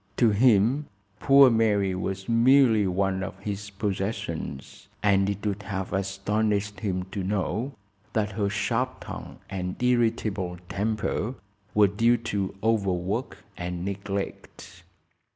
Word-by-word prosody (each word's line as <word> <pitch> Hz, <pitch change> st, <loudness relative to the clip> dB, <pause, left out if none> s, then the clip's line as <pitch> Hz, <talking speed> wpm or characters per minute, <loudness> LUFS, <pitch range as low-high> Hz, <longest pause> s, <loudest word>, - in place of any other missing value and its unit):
To 115 Hz, -3 st, +5 dB
him 120 Hz, +5 st, +3 dB, 0.3 s
poor 140 Hz, -2 st, +7 dB
Mary 105 Hz, -4 st, +2 dB
was 95 Hz, +1 st, -4 dB
merely 115 Hz, -3 st, +5 dB
one 95 Hz, +1 st, 0 dB
of 95 Hz, -, -5 dB
his 105 Hz, 0 st, -5 dB
possessions, 95 Hz, -8 st, -4 dB, 0.2 s
and 100 Hz, -1 st, +3 dB
it 100 Hz, +1 st, -4 dB
would 100 Hz, -1 st, -1 dB
have 95 Hz, -2 st, -4 dB
astonished 100 Hz, +2 st, -1 dB
him 95 Hz, -4 st, -2 dB
to 100 Hz, -, -3 dB
know 105 Hz, +7 st, -1 dB, 0.4 s
that 105 Hz, -1 st, 0 dB
her 100 Hz, 0 st, -1 dB
sharp 120 Hz, +5 st, -1 dB
tongue -, -, -8 dB
and 90 Hz, -1 st, -4 dB
irritable 110 Hz, -7 st, +1 dB
temper 110 Hz, +4 st, -1 dB, 0.4 s
were 105 Hz, -1 st, +7 dB
due 115 Hz, +5 st, +3 dB
to 100 Hz, -4 st, -3 dB
overwork 100 Hz, 0 st, -1 dB
and 90 Hz, 0 st, -4 dB
neglect. 100 Hz, -2 st, -5 dB
100 Hz, 120 wpm, -26 LUFS, 95-110 Hz, 0.4 s, poor